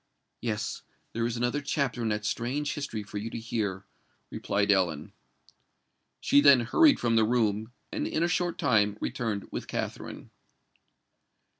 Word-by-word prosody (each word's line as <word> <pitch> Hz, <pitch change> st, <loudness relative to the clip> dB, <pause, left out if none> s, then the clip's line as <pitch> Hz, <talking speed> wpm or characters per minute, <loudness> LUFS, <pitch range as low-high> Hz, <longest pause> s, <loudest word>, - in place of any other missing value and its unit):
"Yes—there 115 Hz, +1 st, -4 dB
is 120 Hz, 0 st, -3 dB
another 120 Hz, +4 st, 0 dB
chapter 140 Hz, -3 st, -1 dB
in 115 Hz, -, 0 dB
that 105 Hz, 0 st, -2 dB
strange 140 Hz, +7 st, -1 dB
history 115 Hz, -7 st, -4 dB
for 105 Hz, 0 st, -6 dB
you 110 Hz, +3 st, -4 dB
to -, -, -6 dB
hear," 105 Hz, -4 st, -3 dB, 0.5 s
replied 100 Hz, 0 st, 0 dB
Ellen. 85 Hz, -6 st, 0 dB, 1.1 s
She 145 Hz, -, +4 dB
then 140 Hz, -3 st, +7 dB
hurried 290 Hz, -, +4 dB
from 115 Hz, -1 st, +2 dB
the 110 Hz, -, +5 dB
room, 110 Hz, -1 st, +1 dB, 0.2 s
and -, -, -2 dB
in 160 Hz, -, 0 dB
a -, -, +3 dB
short 175 Hz, -1 st, 0 dB
time 105 Hz, -3 st, +2 dB
returned 110 Hz, -5 st, -3 dB
with -, -, -5 dB
Katherine. -, -, -5 dB
115 Hz, 145 wpm, -28 LUFS, 105-130 Hz, 1.1 s, then